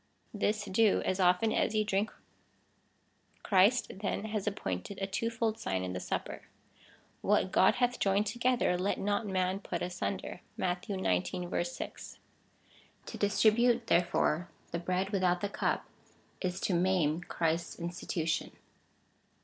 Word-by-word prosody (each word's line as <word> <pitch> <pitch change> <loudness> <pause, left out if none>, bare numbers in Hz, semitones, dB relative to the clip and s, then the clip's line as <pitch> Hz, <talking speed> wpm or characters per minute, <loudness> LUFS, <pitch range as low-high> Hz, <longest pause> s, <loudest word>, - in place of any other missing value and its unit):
This 210 0 0
do, 215 +2 +3
as 185 - 0
often 180 +4 +3
as 220 - +1
ye 215 0 +2
drinh. 205 +1 +1 1.3
Christ, 205 +5 +4
then, 205 0 -2
has 215 -2 -3
appointed 190 - -3
a 195 - 0
two 205 +4 -1
fold 225 -1 -1
sign 95 - -1
in 90 0 -3
the 90 - -3
Supper. - - -4 0.8
What 185 - +2
God 190 - +5
hath 245 0 +1
joined 200 +1 +2
to 220 +4 -4
gether 245 -6 +2
let 195 +2 0
not 205 +2 -1
man 185 0 0
put 175 -3 -4
asunder. 180 +1 -4 0.2
(Matt. 180 0 -1
xix. 175 - -1
6.) - - -7 0.9
To - - -7
distri 210 +1 +4
bute, 240 0 +3
therefore, 175 -2 +2 0.2
the 170 - -2
bread 185 +3 -1
without 180 -3 +2
the 205 - -1
cup, - - -1 0.6
is 180 -1 -2
to 190 - 0
maim 175 -3 +2
Christ's 165 -1 -1
institution. 170 -1 -2
190 Hz, 140 wpm, -31 LUFS, 175-210 Hz, 1.3 s, God